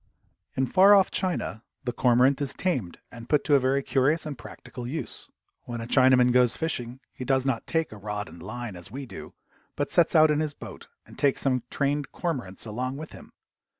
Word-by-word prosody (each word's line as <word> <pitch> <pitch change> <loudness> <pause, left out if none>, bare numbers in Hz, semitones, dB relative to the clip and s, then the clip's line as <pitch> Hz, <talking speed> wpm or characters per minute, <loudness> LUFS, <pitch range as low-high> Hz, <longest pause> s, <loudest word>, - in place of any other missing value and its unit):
In 130 - +1
far 195 +8 +6
off 195 -1 +4
China 175 - -2 0.2
the 125 - -2
cormorant 130 +3 +3
is 140 - -3
tamed 130 - -2
and 120 0 -11
put 150 -2 +3
to 150 - +1
a 140 - +7
very 135 +1 +1
curious 145 +6 +1
and 150 -2 -4
practical 120 0 -9
use. 160 +5 -5 0.4
When 120 -1 -5
a 115 - -5
Chinaman 130 0 +5
goes 125 -1 +4
fishing 125 -6 -3
he - - -7
does 130 0 +1
not 130 -4 -1
take 160 -1 0
a 110 - -9
rod 105 0 -4
and 85 +1 -13
line, 110 +1 -6
as 85 -1 -8
we 135 +2 -7
do, 120 - -10 0.4
but - - -2
sets 170 0 +3
out 155 -1 +7
in 150 - +1
his 155 -2 -2
boat - - -10 0.2
and - - -14
takes 140 -2 +2
some 130 -2 +1
trained 145 0 -1
cormorants 125 - -4
along 125 +5 -3
with 155 +1 -8
him. - - -13
130 Hz, 205 wpm, -26 LUFS, 120-150 Hz, 0.4 s, a